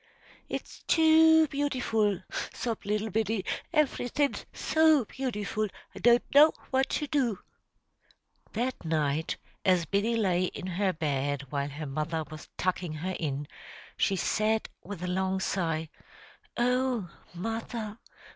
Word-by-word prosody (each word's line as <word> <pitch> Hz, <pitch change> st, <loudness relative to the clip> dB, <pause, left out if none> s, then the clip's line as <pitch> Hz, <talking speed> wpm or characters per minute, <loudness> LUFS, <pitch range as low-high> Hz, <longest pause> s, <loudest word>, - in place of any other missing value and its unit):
"It's -, -, -6 dB
too 320 Hz, 0 st, +6 dB
beautiful!" 230 Hz, -9 st, 0 dB, 0.3 s
sobbed 230 Hz, -4 st, -3 dB
little 210 Hz, +1 st, 0 dB
Biddy. 220 Hz, -2 st, 0 dB, 0.3 s
"Everythin's 290 Hz, -2 st, +1 dB
so 315 Hz, -5 st, +3 dB
beautiful, 215 Hz, -4 st, -2 dB, 0.3 s
I -, -, -9 dB
don't 240 Hz, 0 st, +5 dB
know 295 Hz, +3 st, +8 dB, 0.2 s
what 265 Hz, 0 st, +2 dB
to 295 Hz, -, -1 dB
do.'" 270 Hz, -8 st, +1 dB, 1.2 s
That 245 Hz, +3 st, -2 dB
night, 155 Hz, -1 st, 0 dB, 0.3 s
as 180 Hz, -3 st, +3 dB
Biddy 200 Hz, +8 st, +1 dB
lay 185 Hz, -4 st, +2 dB
in 180 Hz, -, -5 dB
her 185 Hz, +1 st, 0 dB
bed, 145 Hz, -4 st, -1 dB
while 140 Hz, -1 st, -1 dB
her 150 Hz, +2 st, -6 dB
mother 155 Hz, +3 st, -2 dB
was 155 Hz, -1 st, -9 dB
tucking 180 Hz, -3 st, -1 dB
her 180 Hz, +4 st, -3 dB
in, 145 Hz, -2 st, -2 dB, 0.5 s
she 195 Hz, -, +2 dB
said, 215 Hz, +4 st, +1 dB
with 190 Hz, -2 st, -7 dB
a -, -, -2 dB
long 190 Hz, +1 st, 0 dB
sigh, 165 Hz, -4 st, -1 dB, 0.7 s
"Oh, 250 Hz, -5 st, +1 dB, 0.2 s
mother! 225 Hz, +2 st, -4 dB
205 Hz, 125 wpm, -29 LUFS, 170-245 Hz, 1.2 s, know